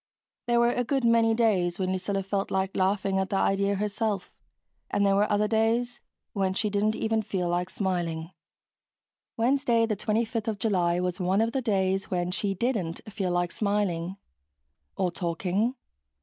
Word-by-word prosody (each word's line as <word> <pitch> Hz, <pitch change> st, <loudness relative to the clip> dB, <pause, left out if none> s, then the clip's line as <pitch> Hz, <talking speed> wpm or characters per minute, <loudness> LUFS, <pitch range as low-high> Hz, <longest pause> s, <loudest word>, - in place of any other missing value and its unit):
There 240 Hz, 0 st, +3 dB
were 235 Hz, 0 st, +4 dB
a 245 Hz, -, 0 dB
good 270 Hz, 0 st, 0 dB
many 230 Hz, -1 st, +4 dB
days 190 Hz, -7 st, +2 dB
when 185 Hz, -1 st, -1 dB
Lucilla 195 Hz, +1 st, -1 dB
felt 195 Hz, 0 st, -2 dB
like 190 Hz, 0 st, -1 dB
laughing 190 Hz, 0 st, +1 dB
at 190 Hz, 0 st, -1 dB
the -, -, -1 dB
idea 200 Hz, +1 st, +2 dB
herself. 210 Hz, -1 st, -2 dB, 0.6 s
And 200 Hz, -, +1 dB
there 195 Hz, -, +4 dB
were 205 Hz, +2 st, +2 dB
other 210 Hz, +1 st, +2 dB
days 230 Hz, +2 st, +1 dB, 0.3 s
when 190 Hz, -2 st, 0 dB
she 210 Hz, +1 st, 0 dB
didn't 210 Hz, +2 st, +1 dB
even 225 Hz, 0 st, 0 dB
feel 190 Hz, -4 st, -2 dB
like 175 Hz, +1 st, -1 dB
smiling. 175 Hz, -4 st, -2 dB, 1.1 s
Wednesday, 235 Hz, -1 st, +3 dB
the 220 Hz, -2 st, -1 dB
25th 225 Hz, +2 st, -1 dB
of 220 Hz, -2 st, -1 dB
July, 180 Hz, -5 st, +1 dB
was 180 Hz, 0 st, -2 dB
one 185 Hz, +2 st, +1 dB
of 225 Hz, +1 st, +2 dB
the 265 Hz, -, -1 dB
days 195 Hz, -4 st, 0 dB
when 175 Hz, -1 st, -1 dB
she 195 Hz, +1 st, -1 dB
didn't 195 Hz, -7 st, -1 dB
feel 195 Hz, -4 st, -1 dB
like 175 Hz, -1 st, 0 dB
smiling. 195 Hz, -4 st, -1 dB, 0.8 s
Or 185 Hz, -2 st, +1 dB
talking. 185 Hz, +7 st, -1 dB
200 Hz, 165 wpm, -27 LUFS, 185-225 Hz, 1.1 s, were